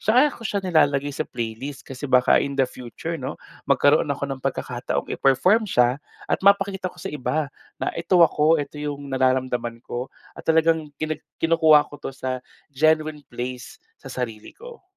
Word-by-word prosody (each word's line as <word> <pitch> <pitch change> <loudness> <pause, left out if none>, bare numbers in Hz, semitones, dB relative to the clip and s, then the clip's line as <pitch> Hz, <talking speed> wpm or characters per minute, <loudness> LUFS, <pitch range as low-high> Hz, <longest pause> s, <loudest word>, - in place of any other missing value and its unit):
saka 255 +7 +4
ko - - -13
siya 200 -2 -2
nilalagay 145 -5 +2
sa 155 - -4
playlist 120 +4 -5
kasi 135 +1 -7
baka 125 -1 +5
in 140 0 -3
the 135 - +4
future 125 -2 -6
'no - - -5 0.3
magkaroon 150 +1 +4
ako 140 0 -2
ng 130 - -7
pagkakataong 125 -2 -3
iperform 185 - +3
siya 125 -1 +2 0.2
at - - -1
mapakita 195 -1 +3
ko - - -18
sa - - -6
iba 150 +1 -2 0.2
na, - - -2
"Eto 170 0 +4
ako, 155 +1 +3
eto 145 0 -5
yung 145 -1 -5
nararamdaman 130 -3 0
ko." 125 +2 -4 0.2
at - - -10
talagang 160 -1 +3
kini 155 0 -3 0.2
kinukuha 160 -2 +5
ko 145 - -10
to - - -5
sa 130 -1 -3 0.3
genuine 155 +1 +2
place 125 +1 -6 0.2
sa - - -10
sarili 115 -4 -6
ko. 475 0 -12
145 Hz, 170 wpm, -23 LUFS, 130-160 Hz, 0.3 s, baka